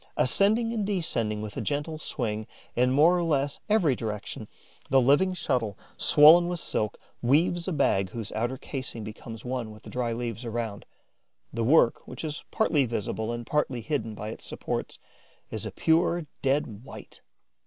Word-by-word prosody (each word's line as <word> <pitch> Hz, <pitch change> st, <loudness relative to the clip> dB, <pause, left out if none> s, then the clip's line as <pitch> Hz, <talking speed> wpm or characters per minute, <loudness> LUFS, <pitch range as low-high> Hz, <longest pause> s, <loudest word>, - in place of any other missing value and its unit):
Ascending 220 Hz, -, +3 dB
and 220 Hz, -3 st, -1 dB
descending 120 Hz, -, -1 dB
with 105 Hz, -1 st, -7 dB
a -, -, -1 dB
gentle 150 Hz, +2 st, -2 dB
swing 110 Hz, -8 st, -3 dB, 0.3 s
in 125 Hz, +1 st, +3 dB
more 150 Hz, +7 st, +5 dB
or 175 Hz, -, +1 dB
less 145 Hz, -3 st, 0 dB
every 180 Hz, -, +4 dB
direction, 105 Hz, -3 st, -5 dB, 0.4 s
the 135 Hz, -, +5 dB
living 145 Hz, +9 st, +4 dB
shuttle, 120 Hz, -, -1 dB, 0.2 s
swollen 160 Hz, +4 st, +7 dB
with 175 Hz, -1 st, -2 dB
silk, 105 Hz, -8 st, -2 dB, 0.2 s
weaves 170 Hz, +8 st, +2 dB
a -, -, 0 dB
bag 95 Hz, -, +2 dB
whose 110 Hz, +1 st, -6 dB
outer 120 Hz, +4 st, -2 dB
casing 130 Hz, -4 st, -6 dB
becomes 110 Hz, +2 st, -8 dB
one 125 Hz, -3 st, -3 dB
with 105 Hz, 0 st, -13 dB
the -, -, -10 dB
dry 125 Hz, -2 st, -1 dB
leaves 115 Hz, 0 st, -4 dB
around. 115 Hz, -3 st, -4 dB, 0.7 s
The 115 Hz, -, -1 dB
work, 125 Hz, -1 st, +4 dB
which 125 Hz, -, -8 dB
is 150 Hz, -2 st, -4 dB
partly 155 Hz, -11 st, +2 dB
visible 110 Hz, 0 st, -2 dB
and 120 Hz, 0 st, -4 dB
partly 135 Hz, -3 st, 0 dB
hidden 115 Hz, -5 st, -2 dB
by 105 Hz, +1 st, -5 dB
its 110 Hz, -, -8 dB
supports, -, -, -4 dB, 0.5 s
is -, -, -4 dB
a -, -, -6 dB
pure 165 Hz, +1 st, +2 dB, 0.2 s
dead 130 Hz, -6 st, 0 dB
white. -, -, -12 dB
130 Hz, 165 wpm, -27 LUFS, 115-160 Hz, 0.7 s, swollen